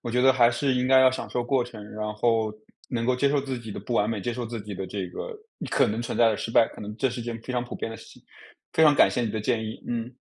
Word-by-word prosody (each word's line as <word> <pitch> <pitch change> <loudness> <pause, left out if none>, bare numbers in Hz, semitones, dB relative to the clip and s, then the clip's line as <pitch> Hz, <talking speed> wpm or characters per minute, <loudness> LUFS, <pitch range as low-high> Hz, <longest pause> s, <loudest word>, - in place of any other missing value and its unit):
我 120 - -4
觉 125 +1 +2
得 130 0 +7
还 120 -2 +5
是 130 +2 0
应 125 0 +1
该 130 0 +6
要 130 0 +7
享 130 - -5
受 125 - -1
过 130 0 +2
程。 115 -3 -10
然 105 0 -3
后 110 0 +1 0.4
能 115 -2 -1
够 130 - +3
接 140 +2 +3
受 145 0 +2
自 135 -2 -4
己 115 -2 -9
的 - - -6
不 120 +4 -4
完 105 0 +2
美， 110 -3 -2
接 120 +4 -2
受 120 0 -4
自 115 -1 -5
己 105 -1 -7
的 95 0 -5
这 95 -3 -4
个 465 - -6 0.4
可 - - +4
能 110 +2 -2
存 120 - -4
在 115 - +6
的 110 - 0
失 - - -4
败， 115 - +5
可 - - -13
能 105 +1 -7
这 135 - +1
是 120 -1 -5
件 115 -1 -5
非 130 - -5
常 125 -1 -1
普 120 - -8
遍 - - -4
的 115 - -7
事 - - -13
情， - - -16 0.5
非 160 - +3
常 150 -2 +7
感 - - +6
谢 125 - -1
你 110 - -1
的 110 - -3
建 110 0 0
议。 110 0 -7
嗯。 120 +1 -3
120 Hz, 345 characters per minute, -26 LUFS, 110-125 Hz, 0.5 s, 得